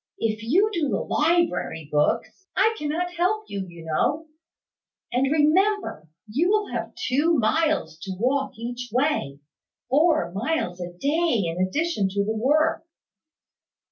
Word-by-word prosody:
If 215 Hz, -1 st, -1 dB
you 335 Hz, -, +3 dB
do 320 Hz, -6 st, 0 dB
the -, -, 0 dB
library 325 Hz, -, 0 dB
books, 150 Hz, -, 0 dB
I 445 Hz, -, +3 dB
cannot 335 Hz, +4 st, -2 dB
help 370 Hz, +5 st, +1 dB
you, 195 Hz, -2 st, -4 dB
you 170 Hz, -2 st, -12 dB
know. 295 Hz, -, 0 dB, 0.9 s
And 265 Hz, +3 st, +1 dB
remember, 315 Hz, -, +2 dB, 0.2 s
you 290 Hz, -, +1 dB
will 420 Hz, -4 st, +1 dB
have 230 Hz, -1 st, -4 dB
two 295 Hz, +6 st, +1 dB
miles 300 Hz, -, +1 dB
to 190 Hz, 0 st, -6 dB
walk 270 Hz, +4 st, 0 dB
each 245 Hz, +2 st, -5 dB
way; 225 Hz, -, 0 dB, 0.5 s
four 300 Hz, -, +3 dB
miles 200 Hz, -, -2 dB
a 175 Hz, 0 st, -5 dB
day 280 Hz, -, +1 dB
in 170 Hz, +2 st, -1 dB
addition 215 Hz, -, 0 dB
to 200 Hz, +1 st, -1 dB
the 220 Hz, +1 st, -1 dB
work." 300 Hz, +8 st, +2 dB
265 Hz, 140 wpm, -24 LUFS, 200-330 Hz, 0.9 s, you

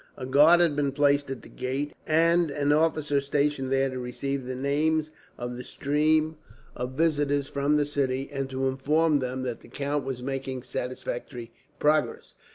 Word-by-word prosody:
A 130 Hz, -, -5 dB
guard 150 Hz, +6 st, +6 dB
had 165 Hz, -4 st, +3 dB
been 140 Hz, -2 st, 0 dB
placed 145 Hz, -1 st, +2 dB
at 135 Hz, -4 st, -6 dB
the -, -, -12 dB
gate, 135 Hz, +3 st, -3 dB
and 165 Hz, +1 st, +3 dB
an 145 Hz, 0 st, 0 dB
officer 150 Hz, -2 st, +2 dB
stationed 140 Hz, -1 st, 0 dB
there 135 Hz, 0 st, +3 dB
to 130 Hz, -1 st, -5 dB
receive 130 Hz, +2 st, -4 dB
the 130 Hz, -, -3 dB
names 155 Hz, +4 st, 0 dB, 0.3 s
of 120 Hz, 0 st, -5 dB
the 125 Hz, -, -6 dB
stream 155 Hz, +3 st, +1 dB, 0.4 s
of 125 Hz, +1 st, -4 dB
visitors 145 Hz, -2 st, +1 dB
from 140 Hz, +1 st, +1 dB
the 150 Hz, -1 st, +2 dB
city, 135 Hz, -2 st, -1 dB
and 135 Hz, -1 st, -3 dB
to 135 Hz, 0 st, -1 dB
inform 150 Hz, +4 st, +2 dB
them 130 Hz, 0 st, -3 dB
that 120 Hz, -3 st, -3 dB
the -, -, -16 dB
count 145 Hz, +1 st, -2 dB
was 130 Hz, -2 st, -5 dB
making 135 Hz, -1 st, -4 dB
satisfactory 125 Hz, -1 st, -5 dB, 0.3 s
progress. 150 Hz, 0 st, +1 dB
140 Hz, 170 wpm, -27 LUFS, 130-150 Hz, 0.4 s, guard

